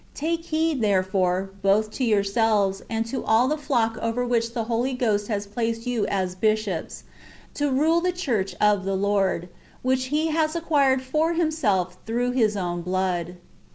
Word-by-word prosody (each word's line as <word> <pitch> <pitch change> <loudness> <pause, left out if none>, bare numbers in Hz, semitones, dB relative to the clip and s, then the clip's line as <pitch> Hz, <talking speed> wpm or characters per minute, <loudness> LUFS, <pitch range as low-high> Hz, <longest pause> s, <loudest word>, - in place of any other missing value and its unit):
Take 330 +2 -2
heed, 315 -4 0
therefore, 190 -2 +1
both 205 +2 +2
to 260 - -3
yourselves, 205 -2 +2
and 225 0 -1
to 260 +4 -4
all 225 +3 +3
the 300 - +1
flock 240 -7 0
over 230 +2 -1
which 235 -1 0
the 230 - 0
Holy 235 +3 -1
Ghost 210 -4 0
has 205 -2 -2
placed 225 +2 -3
you 245 -3 0
as 190 -2 -1
bishops, 215 -3 -1 0.5
to 290 0 0
rule 315 +6 +3
the 360 +1 +1
church 245 - -2
of 210 -2 +3
the 195 0 -1
Lord, 195 -3 +1
*^ 175 - -12 0.3
which 255 0 +1
He 305 +4 0
has 315 0 0
acquired 280 -6 +2
for 310 +6 0
Himself 220 - 0
through 245 +2 0
His 220 -5 +1
own 175 -2 -2
blood." 180 -1 -2
225 Hz, 170 wpm, -24 LUFS, 195-265 Hz, 0.5 s, all